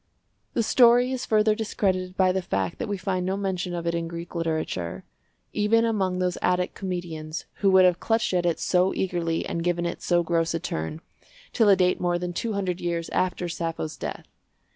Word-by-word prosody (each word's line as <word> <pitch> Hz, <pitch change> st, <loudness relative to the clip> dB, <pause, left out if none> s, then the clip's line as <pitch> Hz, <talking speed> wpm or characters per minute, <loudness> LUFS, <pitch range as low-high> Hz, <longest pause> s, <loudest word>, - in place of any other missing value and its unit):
The 230 Hz, -, +2 dB
story 245 Hz, +2 st, +5 dB
is 255 Hz, -1 st, -3 dB
further 215 Hz, 0 st, +4 dB
discredited 190 Hz, -4 st, -1 dB
by 185 Hz, -1 st, +4 dB
the 190 Hz, +1 st, -1 dB
fact 95 Hz, -, -2 dB
that -, -, -2 dB
we 205 Hz, -1 st, -2 dB
find 185 Hz, -1 st, -1 dB
no 190 Hz, +2 st, -1 dB
mention 185 Hz, -3 st, -2 dB
of 170 Hz, -1 st, -4 dB
it 170 Hz, -, 0 dB
in 170 Hz, 0 st, -2 dB
Greek 170 Hz, +1 st, -7 dB
literature—even 165 Hz, -, -2 dB
among 195 Hz, -5 st, 0 dB
those 180 Hz, -1 st, -1 dB
Attic 180 Hz, 0 st, +1 dB
comedians 170 Hz, -4 st, -5 dB
who 200 Hz, -, +3 dB
would 190 Hz, -1 st, +6 dB
have 180 Hz, -1 st, +3 dB
clutched 225 Hz, -3 st, 0 dB
at 180 Hz, -1 st, +2 dB
it 170 Hz, -2 st, 0 dB
so 180 Hz, +1 st, +2 dB
eagerly 170 Hz, -3 st, -1 dB
and 170 Hz, -, -3 dB
given 175 Hz, 0 st, 0 dB
it 170 Hz, -, -4 dB
so 175 Hz, -1 st, +2 dB
gross 165 Hz, 0 st, 0 dB
a -, -, -1 dB
turn—till 180 Hz, -, -3 dB
a 195 Hz, -, +8 dB
date 180 Hz, -1 st, +2 dB
more 175 Hz, -1 st, +1 dB
than 175 Hz, 0 st, -4 dB
two 225 Hz, +5 st, -2 dB
hundred 185 Hz, -3 st, -2 dB
years 170 Hz, -1 st, -2 dB
after 180 Hz, -1 st, -1 dB
Sappho's 165 Hz, -2 st, -3 dB
death. -, -, -6 dB
180 Hz, 190 wpm, -25 LUFS, 170-195 Hz, -, a